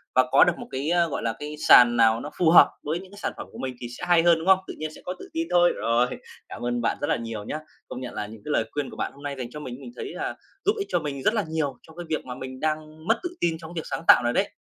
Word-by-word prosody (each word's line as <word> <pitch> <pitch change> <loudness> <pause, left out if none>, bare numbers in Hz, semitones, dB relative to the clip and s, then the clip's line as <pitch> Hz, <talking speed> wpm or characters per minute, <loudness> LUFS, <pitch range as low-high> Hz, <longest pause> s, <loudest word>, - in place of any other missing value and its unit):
và 130 0 +5
có - - +7
được - - +3
một - - -8
cái, 135 +4 -2
a, 175 -1 +3
gọi 145 - -4
là, 115 -1 0
cái 150 +1 -6
sàn 120 -1 +8
nào 115 0 +4
nó 145 - -6
phù 170 -3 +4
hợp 170 - +8
với 160 +4 -2
những 190 +1 -13
cái 205 - -13
sản - - -1
phẩm - - -7
của - - -12
mình 130 -1 -4
thì 120 - -5
sẽ - - -10
hay 170 -2 +5
hơn, 170 -1 +5
đúng 165 - -6
không? 190 -1 +7
Tự - - -6
nhiên 155 0 -4
sẽ - - -13
có 180 - -3
tự - - -10
tin 165 0 -1
thôi. 175 0 +5
Rồi, 115 +2 +2 0.4
cảm - - -7
ơn 120 0 -1
bạn 115 - 0
rất 145 - 0
là - - +2
nhiều 115 -3 -5
nhá. 150 +8 -4 0.3
Công 125 - -7
nhận 125 -1 -6
là 105 - -4
những 110 0 -12
cái 150 - -3
lời 115 - +2
khuyên 145 -2 -3
của - - -11
bạn - - -2
hôm 140 +1 -15
nay 140 -1 -3
dành 120 -2 -5
cho 150 - -7
mình, 125 -5 -6
mình 125 -3 -9
thấy - - -6
là - - -3 0.3
giúp 410 - +5
ích 400 -1 -3
cho - - +1
mình 140 -3 -5
rất 215 - +3
là 210 -5 0
nhiều 145 -5 -2
trong 160 - -15
cái 175 - -6
việc 155 - -2
mà 125 -1 -6
mình 130 0 -8
đang 155 +1 -3
mất 225 - +3
tự 355 - -2
tin 165 -2 +1
trong 160 -1 -10
cái 170 - -3
việc - - -14
sáng - - -4
tạo - - +8
này 120 - +1
đấy. 200 +1 +1
150 Hz, 335 wpm, -25 LUFS, 125-165 Hz, 0.4 s, sàn